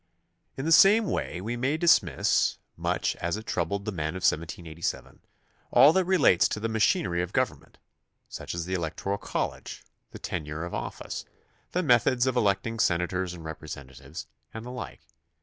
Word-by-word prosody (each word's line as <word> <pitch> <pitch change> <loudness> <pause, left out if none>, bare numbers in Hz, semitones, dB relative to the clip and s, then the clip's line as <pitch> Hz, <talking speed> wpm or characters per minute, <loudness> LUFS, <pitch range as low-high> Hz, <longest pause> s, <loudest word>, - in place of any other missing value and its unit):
In 135 - -3
the 165 - 0
same 205 +6 +7
way 90 - -2
we 115 +5 -3
may 130 +5 0
dismiss, 170 +1 +3 0.2
much - - -1
as 85 +4 -2
it 110 - -8
troubled 100 -1 -2
the 105 - -2
men 80 -2 -3
of 95 - -6
1787, 85 +1 -2 0.5
all 145 +3 +7
that 190 0 +2
relates 170 - +4
to - - -3
the 110 - -1
machinery 105 -5 +1
of 90 - -4
government, - - -2 0.5
such - - -6
as 85 -1 -3
the 95 - -4
electoral 90 +3 -2
college, - - -4 0.3
the - - -10
tenure 75 -1 -4
of 85 - -7
office, - - -5 0.5
the 180 - +1
methods 120 -2 +3
of 130 -1 0
electing 110 0 +1
senators 90 0 0
and 85 -2 -11
repre 80 0 -7
sentatives, 70 +1 -9 0.3
and 110 +1 -8
the 125 - -6
like. 125 - -7
95 Hz, 165 wpm, -27 LUFS, 85-120 Hz, 0.5 s, same